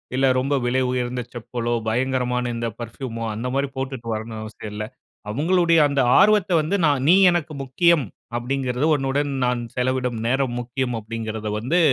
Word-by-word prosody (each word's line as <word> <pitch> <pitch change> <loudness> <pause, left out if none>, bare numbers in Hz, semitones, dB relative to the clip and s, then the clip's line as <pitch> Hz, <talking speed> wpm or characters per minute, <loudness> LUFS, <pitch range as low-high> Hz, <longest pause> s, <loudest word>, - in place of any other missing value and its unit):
இல்ல 135 +1 +2
ரொம்ப 140 +2 0
விலை 130 +2 +1
உயர்ந்த 125 0 -2
செப்பலோ, 120 0 -3
பயங்கரமான 125 0 0
இந்த 115 0 -2
பர்ஃபூமோ 115 0 -6
இந்த 125 +3 -3
மாதிரி 140 0 0
போட்டுட்டு 130 -3 -4
வரணும் 110 0 -6
அவசியம் 110 -1 -8
இல்ல. 105 0 -3 0.4
அவுங்களுடைய 165 - +3
அந்த 140 -1 +1 0.2
ஆர்வத்த 205 -2 +4
வந்து 170 +6 -1
நான் 140 -3 +2
நீ 180 - +8 0.2
எனக்கு 165 -3 -2
முக்கியம் 155 +1 +3 0.3
அப்படிங்கிறது. 125 +2 -1
"உன்னுடன் 140 +1 -1
நான் 125 -1 0
செலவிடும் 125 -2 -1
நேரம் 130 -1 0
முக்கியம்" 125 +1 -3
அப்படிங்கறத 110 0 -5
வந்து 145 +11 +1
125 Hz, 150 wpm, -22 LUFS, 120-140 Hz, 0.4 s, நீ